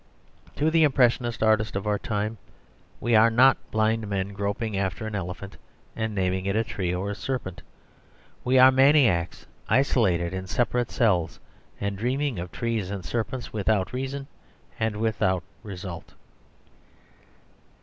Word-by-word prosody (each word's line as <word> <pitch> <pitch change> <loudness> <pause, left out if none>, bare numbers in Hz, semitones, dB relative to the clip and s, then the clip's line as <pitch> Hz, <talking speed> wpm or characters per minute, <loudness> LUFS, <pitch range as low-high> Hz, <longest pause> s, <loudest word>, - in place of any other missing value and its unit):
To 155 +2 +1
the 165 0 +4
impressionist 120 -5 +2
artist 110 -1 +2
of 100 - -3
our 105 -1 0
time 110 -3 -3 0.6
we 120 - 0
are 110 +2 +6
not 130 +4 +6
blind 110 0 0
men 100 -1 -2
groping 100 +2 -3
after 95 0 -2
an 110 - -5
elephant 95 0 -6 0.4
and 110 -1 -3
naming 95 0 -1
it 100 - 0
a 110 - +2
tree 95 -6 -3
or 95 +3 -2
a - - -4
serpent. 100 -3 -4 0.8
We 130 +1 +2
are 130 +1 +8
maniacs, 130 - +3 0.2
isolated 95 -10 +2
in 95 0 -5
separate 120 +3 0
cells, 90 -8 +1 0.4
and 100 -1 -3
dreaming 130 -1 -1
of 90 0 -6
trees 115 -5 -2
and 100 -3 -5
serpents 120 +2 -4
without 105 0 0
reason 135 +2 -4 0.5
and 110 -1 0
without 100 -5 0 0.2
result. 90 -5 -8
110 Hz, 140 wpm, -25 LUFS, 95-120 Hz, 0.8 s, are